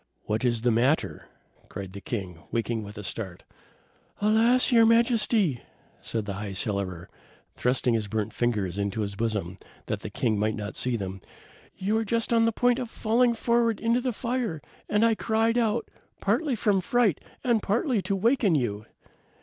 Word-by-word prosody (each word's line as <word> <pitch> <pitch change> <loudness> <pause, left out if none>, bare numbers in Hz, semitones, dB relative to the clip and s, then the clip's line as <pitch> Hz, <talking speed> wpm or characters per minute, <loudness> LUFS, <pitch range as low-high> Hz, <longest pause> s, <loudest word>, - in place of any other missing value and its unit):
"What 110 +2 -2
is 120 -2 +1
the 120 - +3
matter?" 125 +7 +1 0.4
cried 95 -2 -7
the 100 - -8
king, 95 -8 -5
waking 115 -1 -1
with 105 0 -9
a 105 - -6
start. 95 -2 -5 0.8
"Alas! 225 +5 +4
your 230 -2 +6
Majesty," 225 - +3 0.4
said 110 -2 -3
the 100 - -3
High 100 0 -5
Cellarer, 95 -4 -2 0.5
thrusting 125 -1 +1
his 110 -2 0
burnt 110 0 -2
fingers 105 -6 -1
into 100 +2 -1
his 100 -1 -3
bosom, 100 -4 -2 0.3
that - - -2
the - - -6
king 110 -3 0
might 110 +1 +1
not 105 -1 -5
see 125 -1 +1
them. 95 -2 -5 0.6
"You 195 +3 -1
were 225 +1 +2
just 230 +2 0
on 230 -1 +4
the 230 - +3
point 245 +2 +2
of 245 -3 -4
falling 235 +2 +2
forward 235 -1 +1
into 230 +2 +1
the 255 0 -1
fire, 235 - -2 0.3
and 210 +2 +3
I 230 - +4
cried 225 +2 +1
out, 230 0 0 0.3
partly 295 -6 +1
from 200 -3 +2
fright 220 - +2 0.2
and 235 -4 +2
partly 230 +2 +1
to 195 - -1
waken 215 - +3
you." 110 -6 -2
160 Hz, 175 wpm, -27 LUFS, -, 0.8 s, your